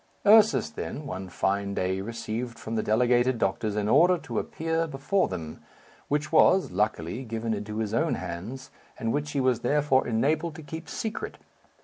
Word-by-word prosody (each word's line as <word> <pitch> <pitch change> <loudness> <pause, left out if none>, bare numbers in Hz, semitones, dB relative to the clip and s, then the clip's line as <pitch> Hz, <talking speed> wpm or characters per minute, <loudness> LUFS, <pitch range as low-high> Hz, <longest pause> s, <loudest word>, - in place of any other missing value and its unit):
Ursus, 215 +2 +6
then, 150 -8 -6
one 95 -6 -5
fine 100 +2 -1
day 95 +1 -1
received 115 +2 -4
from 110 - -6
the 110 - +1
delegated 120 +3 +2
doctors 105 0 -1
an 105 -1 0
order 180 +10 +5
to 120 -8 -3
appear 165 +1 -2
before 150 +7 0
them, 80 -4 -6 0.5
which 150 +1 -1
was, 185 +3 +5
luckily, 105 +2 -1
given 115 -1 -3
into 105 0 -5
his 110 -1 -2
own 115 - +1
hands, 95 +10 -6 0.3
and 115 -2 -1
which 145 0 -2
he 140 - 0
was 130 -3 +2
therefore 140 +1 +2
enabled 150 +8 0
to 160 - -9
keep 160 +1 -8
secret. 220 -1 -4
120 Hz, 165 wpm, -27 LUFS, 105-150 Hz, 0.5 s, Ursus